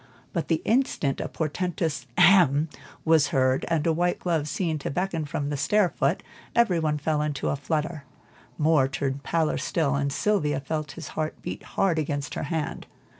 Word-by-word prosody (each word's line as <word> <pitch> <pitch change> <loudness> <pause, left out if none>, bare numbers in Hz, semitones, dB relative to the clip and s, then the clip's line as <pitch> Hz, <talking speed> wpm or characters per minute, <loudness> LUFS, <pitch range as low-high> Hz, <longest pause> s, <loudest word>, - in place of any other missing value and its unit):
But 170 - -2
the 165 -2 0
instant 225 - +1
a - - -4
portentous 160 -4 -2
"Hem!" 170 -5 +5 0.4
was 160 -2 +5
heard, 130 -3 +2
and 165 -3 0
a 165 - +3
white 175 +2 +1
glove 165 -4 -1
seen 160 0 -1
to - - -4
beckon 175 -1 -1
from 145 0 -3
the 145 - -1
stair 205 +6 +3
foot, 145 +3 0 0.3
every 230 -8 +4
one 155 -2 0
fell 150 +1 0
into 150 -2 -1
a - - +1
flutter. 155 +1 -2 0.5
Moor 150 -3 +4
turned 135 0 -2
paler 160 +2 0
still, 155 -4 0
and 140 0 0
Sylvia 150 -6 +1
felt 150 +1 -4
his 165 -3 -8
heart 155 0 -3
beat - - -5 0.2
hard 175 -5 +3
against 145 -2 -2
her - - -3
hand. 160 -3 -3
155 Hz, 175 wpm, -26 LUFS, 145-170 Hz, 0.5 s, Hem